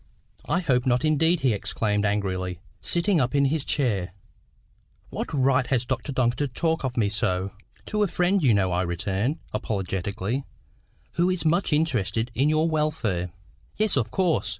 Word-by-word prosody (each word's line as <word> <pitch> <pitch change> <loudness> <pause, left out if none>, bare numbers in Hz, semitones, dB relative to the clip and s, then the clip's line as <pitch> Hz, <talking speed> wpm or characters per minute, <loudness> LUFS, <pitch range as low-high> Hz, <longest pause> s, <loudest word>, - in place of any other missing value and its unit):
"I 180 - +1
hope 130 -6 +1
not 125 +4 +2
indeed," 160 +2 +2
he 130 -4 +3
exclaimed 105 0 0
angrily, 95 -3 -2 0.2
sitting 175 0 +2
up 125 +1 0
in 140 0 +4
his 145 +1 0
chair. 100 - 0 1.0
"What - - -4
right 130 -2 +2
has 125 -2 +1
Dr 130 +3 -3
Duncan 125 -2 +1
to 145 - 0
talk 160 +5 -1
of 130 -2 -3
me 110 -3 +3
so?" 100 -2 -1 0.3
"To 210 -1 -1
a 205 - +4
friend, 180 +2 +1
you 125 -8 +4
know," 95 -2 +2
I 90 +1 +1
returned, 100 - -1 0.2
apologetically, 100 +3 -2 0.7
"who 175 +2 +2
is 185 -2 -1
much 170 +4 +2
interested 120 - 0
in 135 +5 +2
your 155 +1 +2
welfare." 145 - -1 0.5
"Yes, 215 -1 +2
of 120 -5 +1
course. 180 +4 +1
130 Hz, 165 wpm, -25 LUFS, 100-155 Hz, 1.0 s, in